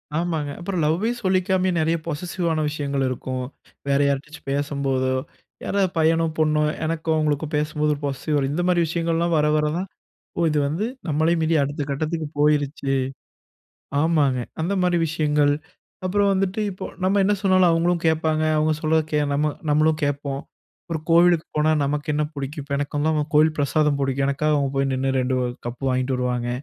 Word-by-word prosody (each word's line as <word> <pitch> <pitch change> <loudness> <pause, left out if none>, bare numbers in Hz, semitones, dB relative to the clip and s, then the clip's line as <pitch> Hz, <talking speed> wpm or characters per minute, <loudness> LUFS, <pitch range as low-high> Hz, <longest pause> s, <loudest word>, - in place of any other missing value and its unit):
ஆமாங்க. 160 -3 -1
அப்புறம் 175 -1 -2
லவ்வே 170 +9 +1
சொல்லிக்காமயே 185 0 +2
நிறைய 160 +1 +2
பொசெசிவ் 170 +3 -3
ஆன 155 - 0
விஷயங்கள் 140 -2 -2
இருக்கும். 130 0 -3 0.5
வேற 140 0 +2
யாரிட்டயாச்சு 145 +3 -3
பேசும்போதோ, 140 -2 0 0.5
யாராவது 195 -2 +1
பையனோ 165 +1 +3
பொண்ணோ 155 -1 +2 0.2
எனக்கும் 160 0 -1
அவங்களுக்கும் 150 0 -1
பேசும்போது 150 0 0
ஒரு 140 - -12
பொசெசிவ் 140 0 -1
இந்த 160 +5 -1
மாதிரி 175 -1 +3
விஷயங்கள்லாம் 170 +1 0
வர 150 0 +3
வர 150 - +2
தான். 190 - -3 0.6
இது 150 - +1
வந்து 165 +9 -1 0.2
நம்மளயும் 160 +2 +1
மீறி 160 +1 +2
அடுத்த 145 +1 -2
கட்டத்துக்கு 155 +3 -2
போயிருச்சு. 145 -2 +1 1.1
ஆமாங்க 150 -5 +2 0.2
அந்த 175 +5 0
மாரி 180 -1 +2
விஷயங்கள். 150 -2 +2 0.5
அப்புறம் 200 +2 +2
வந்துட்டு 195 +2 0
இப்போ 185 - -7 0.2
நம்ம 195 +2 +3
என்ன 205 +2 +3
சொன்னாலும் 185 -2 +4
அவங்களும் 170 +1 +1
கேட்பாங்க. 160 -1 +1
அவங்க 155 +1 +2
சொல்ல 160 0 +3 0.3
நம்ம 150 +1 +1 0.2
நம்மளும் 155 +1 +3
கேட்போம். 140 -1 -2 0.5
ஒரு 160 - -1
கோவிலுக்கு 170 0 +5
போனா 155 +1 +3
நமக்கு 145 +1 -2
என்ன 150 - +1
பிடிக்கும்? 140 +1 -5
இப்போ 140 0 -3
எனக்கு 145 +1 -3
வந்து 150 0 +1
கோவில் 155 +1 +4
பிரசாதம் 145 0 +2
பிடிக்கும். 135 0 0
எனக்காக 150 +2 +1
அவங்க 140 -2 0
போய் 135 0 +1
நின்னு 130 +1 0
2 130 +1 0 0.3
கப்பு 120 +3 -7
வாங்கிட்டு 130 +1 0
வருவாங்க. 125 -1 -1
155 Hz, 160 wpm, -23 LUFS, 140-165 Hz, 1.1 s, கோவிலுக்கு